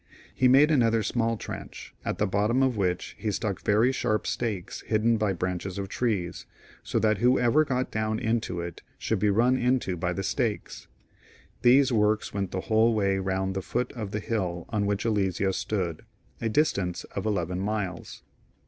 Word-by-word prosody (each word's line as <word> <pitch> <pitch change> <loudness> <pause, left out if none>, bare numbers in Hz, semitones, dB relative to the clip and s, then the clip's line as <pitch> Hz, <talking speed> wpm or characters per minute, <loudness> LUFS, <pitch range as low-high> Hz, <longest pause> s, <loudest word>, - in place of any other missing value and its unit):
He 130 - +3
made 140 +5 +6
another 115 -6 +3
small 115 +1 0
trench, - - -8
at - - -2
the 105 - +1
bottom 105 +6 +1
of 130 -2 +2
which 90 -3 -1
he 110 - -2
stuck 105 -1 -2
very 110 +5 +3
sharp 120 -5 -1
stakes 105 -6 -3
hidden 115 +1 +2
by 105 -2 +1
branches 90 +1 -3
of 100 -1 -4
teees, 100 -9 -2 0.3
so - - -2
that 110 -2 +2
whoever 125 +4 +4
got 130 -3 -2
down 110 0 -1
into 110 -7 -1
it 85 -1 -7 0.2
should 110 - -1
be 105 - +2
run 120 +5 +3
into 125 -7 +1
by 90 +1 -2
the 95 - -3
stakes. 110 +1 -2 0.7
These 130 +2 +5
works 105 -2 +1
went 100 -2 -2
the 95 - -3
whole 110 +2 +3
way 100 -2 +1
round 95 0 -1
the 95 - -2
foot 120 +5 -2
of 110 -5 -5
the 105 +1 -3
liill 90 -7 -2
on 105 -3 0
which 100 +2 -1
Alesia 95 -3 +1
stood, 90 -6 -2 0.4
a 115 - 0
distance 100 - 0
of 100 - -4
eleVen 90 -4 -1
miles. 100 -3 -4
105 Hz, 175 wpm, -27 LUFS, 95-115 Hz, 0.7 s, made